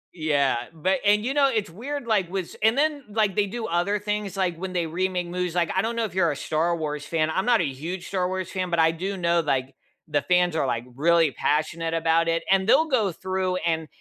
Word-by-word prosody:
Yeah, 145 -6 +1 0.2
but 185 +5 0
and, 210 +2 +3
you 270 - 0
know, 280 -2 +4
it's 215 -8 -2
weird 275 - -5
like 205 -6 +1
with 190 -2 -2
s - - -13
and 220 +4 +3
then 295 -2 +1
like 210 -3 +1
they 205 -1 +2
do 230 +2 -5
other 175 +5 0
things 210 -1 -3
like 180 -3 0
when 185 +1 -5
they 175 -2 -1
remake 180 +2 -1
movies, 180 -1 -3
like, 170 -2 +1
I 190 - +3
don't 230 +2 -2
know 230 - 0
if 200 -6 -4
you're 175 -4 +2
a - - -4
Star 165 +4 0
Wars 150 -2 -4
fan. 155 +1 0
I'm 190 +8 -1
not 235 -5 +4
a - - +1
huge 165 +7 -5
Star 185 -2 0
Wars 185 -1 -4
fan, 185 -2 -2
but 170 - 0
I 160 0 +5
do 190 +4 -4
know 170 -1 +2
like 135 -4 -1 0.3
the 145 - +1
fans 180 -2 +2
are 140 - +1
like 120 0 -2
really 165 0 +3
passionate 165 +5 -1
about 165 0 +2
it, 165 0 0
and 195 +2 +3
they'll 320 - +5
go 220 - +1
through 185 +1 -2
and 160 -3 -1
180 Hz, 245 wpm, -25 LUFS, 165-200 Hz, 0.3 s, I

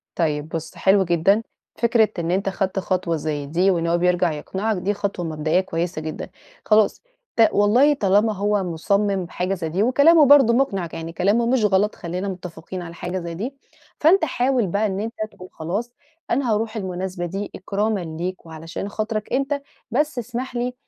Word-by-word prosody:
طيب 150 -2 -1
بُصّ، 165 -1 -5
حلو 195 0 +4
جدًا، 180 +5 +3 0.3
فكرة 230 -2 +3
إن 170 0 -1
أنت 195 +2 0
خدت 190 0 -1
خطوة 185 -3 -1
زي 150 -2 -3
دي 175 +6 +2
وإن 170 -2 0
هو 170 +1 +2
بيرجَع 180 -2 +2
يقنِعك 195 +8 -2
دي 195 +3 -1
خطوة 200 -3 -3
مبدئيّة 155 +2 +1
كويّسة 170 -3 -3
جدًا، 155 0 -5 0.4
خلاص 215 -1 +3 0.3
ت 225 -1 +6
والله 240 +9 +4
طالما 210 -2 +2
هو 205 0 0
مُصمِّم 195 +3 0
بحاجة 180 +2 -2
زي 170 -4 -4
دي 180 +6 0
وكلامه 285 +6 +6
برضه 275 -4 +7
مُقنِع 200 -9 +1
ك - - -11
يعني 165 0 -6
كلامه 205 +7 +2
مش 245 -2 +2
غلط 205 +1 +2
خلّينا 180 +3 -4
مُتفقين 180 -1 -7
على 170 -1 -8
حاجة 175 +2 -4
زي 170 -1 -5
دي، 230 +11 -4 0.5
فأنت 330 +3 +5
حاول 255 -4 +1
بقى 200 +4 0
إن 195 -1 -2
أنت 225 +2 -4 0.2
تقول: 185 0 -12
"خلاص 200 +10 -4 0.4
أنا 255 -5 +1
هارُوح 220 +1 -1
المناسبة 185 -2 -3
دي 195 +4 -4
إكرامّا 205 +2 -1 0.2
ليك 180 +1 -4
وعلشان 165 +4 -6
خاطرك 215 +1 -3
أنت، 275 +2 0 0.3
بس 295 +3 0
اسمح 245 +2 -4
لي 245 +1 -1
195 Hz, 180 wpm, -22 LUFS, 175-225 Hz, 0.5 s, برضه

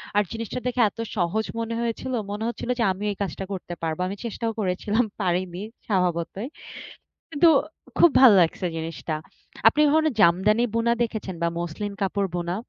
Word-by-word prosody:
আর 205 - +4
জিনিসটা 230 +2 -4
দেখে 250 0 +1
এত 215 - -21 0.2
সহজ 195 +5 0
মনে 230 0 -3
হয়েছিল। 235 +2 -3 0.2
মনে 210 +2 -4
হচ্ছিল 235 +1 -5
যে, - - +3
আমি 190 +2 -5
এই 200 - -7
কাজটা 195 0 -3
করতে 180 -2 -6
পারবো। 160 0 -2
আমি 195 - -4
চেষ্টাও 230 0 -2
করেছিলাম, 205 +4 +1 0.2
পারিনি 180 0 -1 0.3
স্বভাবতই। 180 +1 -1 0.8
কিন্তু 325 +2 +4 0.5
খুব 345 - +7
ভাল 260 -2 +10
লাগছে 175 +2 +1
জিনিসটা। 160 0 -4 0.5
আপনি 295 +7 +2
ধরুন 315 0 +4 0.2
জামদানি 200 +7 +4
বুনা 230 0 +2
দেখেছেন 220 -5 -3
বা 170 - +3
মসলিন 175 +5 -4
কাপড় 195 0 0
বোনা? 175 0 -2
200 Hz, 160 wpm, -25 LUFS, 180-230 Hz, 0.8 s, ভাল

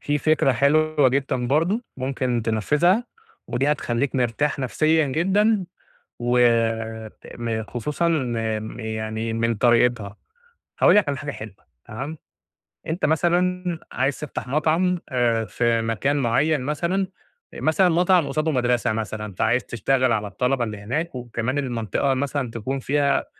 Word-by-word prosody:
في 145 0 0
فكرة 150 -3 +2
حلوة 150 +2 +3
جدًا 130 -2 -1
برضه 165 - +1
ممكن 130 -2 -1
تنفِّذها، 150 - +2 0.4
ودي 140 +4 +1
هتخلّيك 130 -1 -2
مرتاح 130 +4 0
نَفْسيًا 155 +4 +2
جدًا 195 +7 +2 0.5
و 120 +1 +1 1.0
م 115 -2 -2
خصوصًا 140 +9 -2
إن 115 -8 -1
م 110 +2 -8
يعني 110 0 -3
من 115 +1 0
طريقتها. 120 -2 +2 0.6
هاقول - - +6
لك 205 -7 +4
على 140 - -2
حاجة 145 +1 -5
حلوة 110 -5 -9 0.3
تمام، 135 +8 -6 0.7
أنت 165 +3 -1
مثلًا 175 +2 +1
عايز 135 +2 -1
تفتح 150 -4 -6
مطعم 160 +6 +1
آآ 120 -4 +1
في 115 +1 0
مكان 115 +6 0
معيّن 140 +4 +1
مثلًا، 170 +7 -1 0.5
مثلًا 175 +4 +2
مطعم 175 -1 +3
قصاده 155 +1 0
مدرسة 120 -4 +1
مثلًا 110 -1 -4
فعايز 120 +6 +1
تشتغل 130 +2 +1
على 105 -2 0
الطلبة 125 +5 0
اللي 105 -2 -4
هناك 130 +10 -3
وكمان 120 +2 -3
المنطقة 125 0 -1
مثلًا 135 -2 -2
تكون 130 +4 -3
فيها 140 +1 +1
130 Hz, 135 wpm, -23 LUFS, 115-155 Hz, 1.0 s, هاقول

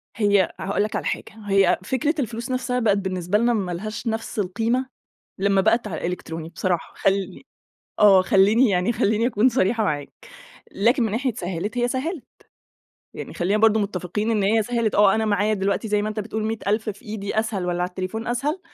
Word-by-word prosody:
هي 205 -4 +2
هاقول 200 +1 0
لك 210 - -3
على - - -3
حاجة، - - -3
هي 195 -2 +3
فكرة 260 - 0
الفلوس 235 +1 -4
نفسها 250 0 -1
بقت 210 -4 +2
بالنسبة 185 0 -1
لنا 235 +2 +2
ما 195 -5 -1
لهاش 215 +7 -5
نفس 225 -1 -3
القيمة، 225 +7 0 0.5
لمّا 195 0 +3
بقت 220 +2 +2
على 165 - -5
الإلكتروني 165 -2 -5
بصراحة. 175 0 -2
خلّي 195 +2 -1 0.6
آه، 195 -3 +7
خلّيني 205 +6 +4
يعني 180 +5 +1
خلّيني 220 +2 +1
أكون 240 +1 +3
صريحة 225 -1 +1
معاك. 145 -4 -2 0.6
لكن 235 +6 +2
من 225 - 0
ناحية 255 +2 0
سهلت، 190 +4 -4
هي 240 - +1
سهلت، 280 +5 -3 0.9
يعني - - -7
خلّينا 190 +4 0
برضو 220 0 +5
متّفقين 200 +2 -2
إن 215 -3 +1
هي 220 +3 +3
سهلت، 230 -1 -1
آه 200 -1 +5
أنا 220 - 0
معايا 210 0 +1
دلوقتي 200 +2 -1
زي 210 0 +1
ما 210 - -2
أنت 215 0 -3
بتقول 215 +1 -4
100.000 220 0 -1
في 205 - -12
إيدي 210 -1 -4
أسهل 205 -5 -3
والّا 175 0 -1
على 180 - -1
التليفون 185 +5 -5
أسهل؟ 280 +9 -1
210 Hz, 185 wpm, -23 LUFS, 190-230 Hz, 0.9 s, آه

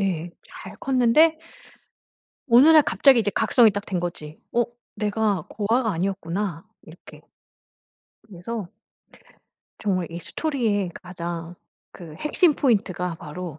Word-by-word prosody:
예 175 -3 -2
잘 - - -12
컸는데 270 +5 +3 1.1
어느 245 +5 +7
날 315 -1 +8
갑자기 275 -3 +4
이제 205 -2 -1
각성이 225 0 +4
딱 205 0 -5
된 185 -3 -2
거지 160 -3 -6
'어? 240 0 +2 0.3
내가 210 -4 -1
고아가 220 +2 0
아니었구나.' 185 0 -3 0.2
이렇게. 160 +2 -15 1.1
그래서 200 +2 -6 1.1
정말 185 -4 -1
이 170 - -6
스토리의 220 - -2
가장 175 -2 -7 0.4
그 165 -4 -11
핵심 300 - +2
포인트가 195 - 0
바로 165 0 -8
200 Hz, 245 characters per minute, -23 LUFS, 175-235 Hz, 1.1 s, 날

